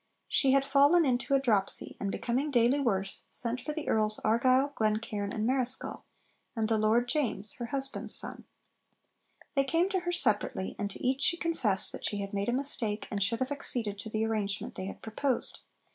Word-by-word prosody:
She 265 -2 +3
had 275 0 +3
fallen 285 +5 +5
into 260 +1 +1
a - - +4
dropsy, 215 -7 +3
and, 200 - -2
becoming 255 +8 -1
daily 245 +1 +3
worse, 195 -7 0
sent 240 +1 -4
for 300 - -4
the 300 0 -5
Earls 215 -1 +3
Argyll, 255 +5 +3
Glencairn, 215 -2 -1
and 215 0 -2
Marischal, 255 0 -1 0.5
and 220 -2 0
the 220 -1 +1
Lord 225 +3 +2
James 235 -7 0
(her 240 - -3
husband's 270 +2 -2
son). - - -5 1.1
They 275 - +3
came 330 +7 +1
to 385 -2 0
her 350 0 -3
separately, 215 - 0
and 205 - -1
to 200 - -7
each 265 +1 +1
she 345 - +3
confessed 250 - 0
that - - -8
she 205 - -1
had 200 0 -5
made 200 +2 -1
a - - +2
mistake, 240 -5 -2
and 200 - -2
should 230 +4 0
have 260 +2 -1
acceded 230 -7 -2
to 220 - -6
the 220 +1 -1
arrangement 210 -2 -2
they 185 - -5
had 195 - -8
proposed. 245 +4 -1
240 Hz, 190 wpm, -30 LUFS, 215-275 Hz, 1.1 s, fallen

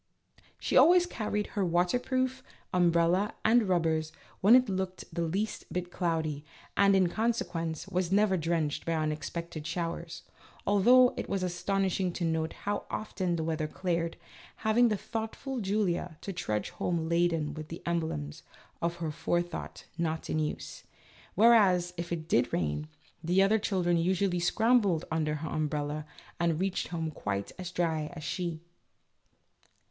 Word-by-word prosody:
She - - -2
always 355 +1 +7
carried 210 -9 -2
her 200 - 0
waterproof, 250 +9 +1 0.3
umbrella, 175 +2 +3
and 225 -2 +4
rubbers 160 -3 +1 0.3
when 210 +6 +7
it 255 -1 +5
looked 190 -1 -3
the 170 - -2
least 190 +7 -2
bit 180 0 -3
cloudy, 160 -5 -1 0.3
and, 200 -1 +5
in 185 -2 +4
consequence, 175 -6 -2
was 185 -2 -1
never 200 -1 +4
drenched 165 -3 -1
by 165 - -1
unexpected 155 +1 -3
showers, 165 0 -4 0.4
although 245 +6 +6
it - - -4
was 195 -2 -1
astonishing 185 +1 0
to 175 - -2
note 160 0 -1
how 205 +1 -3
often 185 -5 -2
the 160 - -2
weather 160 -1 -1
cleared, 170 0 -2 0.5
leaving 235 +3 +5
the 210 - 0
thoughtful 230 +5 -4
Julia 190 -5 -1
to 195 - -5
trudge 105 -11 -2
home 165 -2 -2
laden 165 -3 +1
with 155 0 -7
the 165 - -8
emblems 160 - -2 0.4
of 170 0 0
her 165 -2 -3
forethought 175 +2 -3
not 160 -1 -2
in 155 - +1
use; 155 -1 -4 0.5
whereas, 195 -5 +5
if 170 0 -5
it 160 -2 -3
did 120 -6 +2
rain, 75 -3 -1 0.4
the 180 +4 +4
other 215 +3 +3
children 180 -4 +1
usually 180 +1 +1
scrambled 205 -1 +3
under 155 -1 0
her 155 +1 -5
umbrella 150 0 -2 0.3
and 170 -2 +1
reached 190 0 -1
home 165 -2 -3
quite 100 -8 -3
as 180 -2 -4
dry 160 -4 -1
as 155 - -8
she. 170 +1 -3
175 Hz, 145 wpm, -30 LUFS, 160-195 Hz, 0.5 s, always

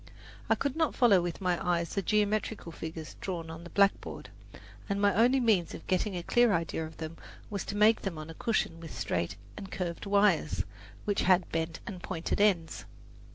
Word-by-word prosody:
I - - +5
could 280 -1 -2
not 320 -1 +1
follow 215 -8 +5
with 175 +2 -4
my 180 -2 0
eyes 170 -1 0
the 200 - 0
geometrical 210 -2 0
figures 160 -1 -7
drawn 170 -4 -4
on 165 +1 -8
the 170 - -9
blackboard, 200 +2 +1 0.6
and 200 0 0
my 200 -1 +4
only 245 +6 +4
means 210 -9 +2
of - - -10
getting 185 +1 0
a 175 - -4
clear 240 +1 +4
idea 165 -1 -1
of 160 - -14
them 160 0 -6 0.3
was 200 -2 -2
to 200 - -4
make 215 +2 +5
them 190 -5 -4
on 155 0 -7
a 165 - -8
cushion 215 -4 -1
with 165 -1 -9
straight - - -1 0.2
and 195 -2 -8
curved 175 +1 -4
wires, 200 -6 +3 0.4
which 205 -1 +1
had 185 -2 +3
bent 165 0 -2
and 185 -3 -7
pointed 175 +3 -2
ends. 180 -6 +2
185 Hz, 195 wpm, -30 LUFS, 165-210 Hz, 0.6 s, I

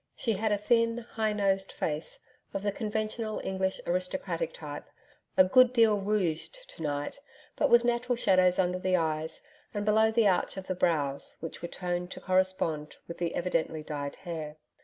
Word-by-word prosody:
She 230 - 0
had 215 +2 0
a 205 - +3
thin, 230 +2 +2
high 225 -2 -2
nosed 195 -2 +1
face 150 0 -3 0.3
of 195 - -2
the 205 - +1
conventional 215 +1 -2
English 190 0 -1
aristocratic 185 - -2
type, - - -8 0.5
a 185 - +9
good 250 +7 +5
deal 225 -4 +5
rouged 205 - -1
to - - -12
night, 145 - -3 0.4
but - - +2
with 235 0 +6
natural 240 +1 +1
shadows 185 -5 +4
under 180 -1 +1
the 185 0 +2
eyes 160 -2 -1 0.3
and 205 0 -1
below 220 +1 +4
the 220 -1 +3
arch 190 0 +1
of 190 - -5
the 185 - -1
brows 150 -6 0
which 165 - -7
were 170 - -3
toned 180 0 -3
to - - -9
correspond 185 -5 0
with 170 - -8
the 170 -1 -1
evidently 165 -3 -1
dyed 145 -2 -4
hair. 160 -4 -6
190 Hz, 175 wpm, -29 LUFS, 170-220 Hz, 0.5 s, a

